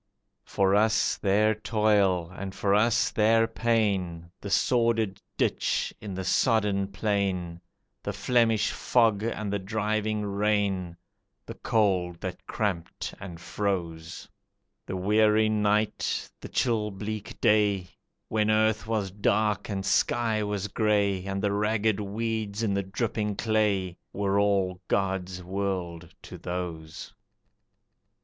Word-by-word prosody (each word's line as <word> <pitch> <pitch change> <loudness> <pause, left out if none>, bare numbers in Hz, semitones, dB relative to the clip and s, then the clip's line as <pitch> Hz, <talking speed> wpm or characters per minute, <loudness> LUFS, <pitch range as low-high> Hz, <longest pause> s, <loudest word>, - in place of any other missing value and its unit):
For 95 -1 +1
us 110 +1 +3
their 105 +2 +3
toil 105 -5 +1
and 95 0 -6
for 100 +1 +1
us 110 +3 +3
their 115 +1 +4
pain, 100 -7 0
The 100 - -6
sordid 115 -2 +1 0.2
ditch - - 0
in 100 -3 -6
the 95 - -3
sodden 105 -3 +2
plain, 95 -4 -2 0.4
The - - -3
Flemish 115 -4 +2
fog 115 -4 +2
and 110 -2 -3
the 100 - 0
driving 110 +1 -1
rain, 100 -3 0 0.5
The - - -7
cold 90 -6 0
that - - -6
cramped 95 -6 -3
and 90 -4 -8
froze; 85 -3 -3 0.6
The 95 - -3
weary 105 +3 +3
night, 105 0 0
the - - -9
chill 110 -4 +1
bleak 105 +1 -6
day, 100 -4 +2 0.4
When 110 -1 +1
earth 110 0 +2
was 105 -4 -1
dark 105 +1 0
and 95 -2 -3
sky 115 0 +1
was 105 -1 -2
grey, 100 -3 +1
And 95 0 -3
the 100 - +2
ragged 105 0 +1
weeds 110 +1 -3
in 105 -3 +1
the 100 - +1
dripping 105 +1 -2
clay 100 -5 0 0.2
Were 100 0 +1
all 95 -3 +1
God's 95 -2 -1
world 90 -3 -3
to - - -10
those. 85 -3 -6
100 Hz, 125 wpm, -27 LUFS, 95-110 Hz, 0.6 s, their